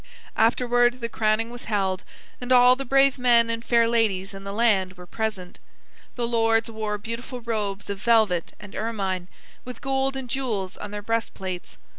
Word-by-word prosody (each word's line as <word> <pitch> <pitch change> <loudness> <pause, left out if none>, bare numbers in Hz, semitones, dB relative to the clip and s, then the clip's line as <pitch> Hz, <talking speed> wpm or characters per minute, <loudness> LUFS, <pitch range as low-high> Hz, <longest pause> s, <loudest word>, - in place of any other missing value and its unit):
Afterward 245 +2 +3
the 235 -1 -3
crowning 220 +1 0
was 245 0 -9
held, 195 -3 -1 0.4
and 245 +1 -5
all 250 0 +7
the 275 +1 -5
brave 275 +1 +3
men 235 -2 +4
and 230 0 -3
fair 235 -1 +3
ladies 205 -5 +1
in 195 0 -9
the 200 - -5
land 200 -4 +2
were 180 -1 -12
present. 205 -3 -4 0.6
The 240 -2 -1
lords 225 -1 +2
wore 215 -1 -3
beautiful 230 +4 -6
robes 210 -3 -3
of 200 -1 -4
velvet 215 -8 +2
and 205 -1 -11
ermine, 195 -5 -2 0.4
with 250 0 -8
gold 270 0 0
and 265 -1 -5
jewels 230 -8 -2
on 210 - -7
their 205 0 -6
breast 230 +1 -1
plates. 185 -2 -6
225 Hz, 175 wpm, -25 LUFS, 200-240 Hz, 0.6 s, all